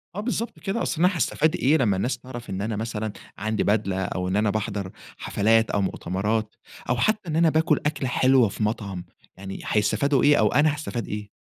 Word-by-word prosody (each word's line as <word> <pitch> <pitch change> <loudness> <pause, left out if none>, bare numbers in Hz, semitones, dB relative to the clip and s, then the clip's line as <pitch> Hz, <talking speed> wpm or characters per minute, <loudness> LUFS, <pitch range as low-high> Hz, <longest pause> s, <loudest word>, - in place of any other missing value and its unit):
آه، - - -3
بالضبط 230 +1 -3
كده. 200 +3 -2
أصل 160 - -2
أنا 180 - +6
حاستفيد 160 -3 +1
إيه 150 +5 +3
لمّا 105 -8 +2
الناس 120 +7 -1
تعرَف 120 -2 -9
إن 95 +1 -3
أنا 110 +1 -2
مثلًا 110 -1 -3 0.3
عندي 110 +2 -1
بدلة، 100 -2 0
أو 90 0 -3
إن 95 - -1
أنا 105 +1 +2
باحضَر 100 -2 -3 0.3
حفلات 110 +2 +2
أو 100 - +1
مؤتمرات، 105 +4 -2 0.3
أو 125 - +2
حتى 215 - 0
إن 155 - -2
أنا 165 0 +4
باكُل 160 -1 +2
أكلة 145 -3 -1
حلوة 130 -2 +4
في 105 - -4
مطعم، 100 -4 -3 0.3
يعني 95 0 -7
هيستفيدوا 115 +6 +2
إيه 145 0 +6
أو - - +4
أنا 150 0 +4
هاستفيد 145 -6 -5
إيه؟! 105 0 -5
115 Hz, 200 wpm, -24 LUFS, 105-150 Hz, 0.3 s, أنا